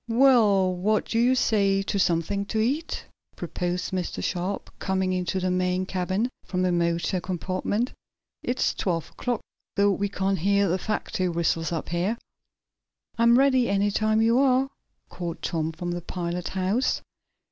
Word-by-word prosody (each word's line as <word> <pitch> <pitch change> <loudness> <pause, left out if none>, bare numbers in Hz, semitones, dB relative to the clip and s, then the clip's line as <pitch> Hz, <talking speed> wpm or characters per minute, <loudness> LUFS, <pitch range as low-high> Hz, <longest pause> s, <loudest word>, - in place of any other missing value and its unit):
"Well, 225 -7 +5
what 210 +4 +1
do 230 - -1
you 250 +2 +4
say 200 -5 +2
to 200 - -1
something 185 +3 +1
to 220 - -3
eat?" 275 +9 -1 0.3
proposed 180 0 -3
Mr. 185 -2 -3
Sharp, 185 +3 -3
coming 190 -1 0
into 185 +1 -1
the 185 0 0
main 180 0 0
cabin, 190 +4 -1 0.2
from 185 0 -2
the 180 - +2
motor 170 +1 0
compartment. 185 +6 -2 0.5
"It's 245 +1 0
twelve 165 -4 -2
o'clock, 245 -3 -2 0.3
though 200 0 +4
we 200 +1 -1
can't 195 -1 0
hear 200 +3 +3
the 185 +2 0
factory 190 -3 -1
whistles 165 -1 0
up, 165 -2 -3
here." 180 +7 0 1.0
"I'm 235 +1 +6
ready, 260 -2 +4
any 200 +1 +2
time 215 +1 +2
you 230 +2 +4
are," 270 0 +3 0.4
called 175 -2 -6
Tom, 160 -1 -1
from 175 +2 -4
the 175 0 -3
pilot 175 0 -4
house. 190 +7 0
190 Hz, 155 wpm, -26 LUFS, 180-220 Hz, 1.0 s, I'm